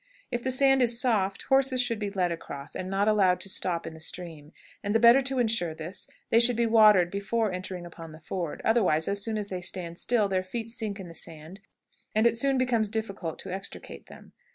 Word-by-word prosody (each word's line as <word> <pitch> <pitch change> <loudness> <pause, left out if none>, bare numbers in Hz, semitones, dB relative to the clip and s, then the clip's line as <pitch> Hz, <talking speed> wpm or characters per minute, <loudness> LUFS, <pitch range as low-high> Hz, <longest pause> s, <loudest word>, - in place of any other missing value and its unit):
If 240 - -2
the 260 - -1
sand 270 +1 +4
is 235 -1 +3
soft, 200 -6 0
horses 270 -1 +2
should 240 -3 0
be 205 -1 -2
led 185 -3 -1
across, 145 -3 -7
and 185 - -4
not 195 +2 0
allowed 190 -4 +3
to 195 - -5
stop 175 -3 -1
in - - -7
the 160 - -12
stream; 160 -2 -7 0.3
and 205 +2 -1
the - - +5
better 235 +3 +7
to 265 0 -2
insure 220 -9 +1
this, 165 +4 -6 0.2
they 230 - +6
should 240 +1 +5
be 235 +1 +1
watered 210 -6 +5
before 205 +2 -1
entering 185 -1 -6
upon 165 -1 -10
the 155 - -12
ford; 170 -1 -5
otherwise, 190 -9 +2
as 200 0 -1
soon 220 -1 -2
as 205 -1 -4
they 185 -1 -4
stand 175 -2 -3
still, 230 -4 +1
their 190 -1 -1
feet 225 +4 -5
sink 215 -3 -4
in 190 - -8
the 165 - -11
sand, 160 +3 -6 0.6
and 230 +2 +3
soon 275 +3 +2
it 255 0 +2
becomes 230 -4 0
difficult 200 -6 -4
to 190 - -7
extricate 195 +1 -8
them. - - -15
200 Hz, 225 wpm, -27 LUFS, 180-230 Hz, 0.6 s, better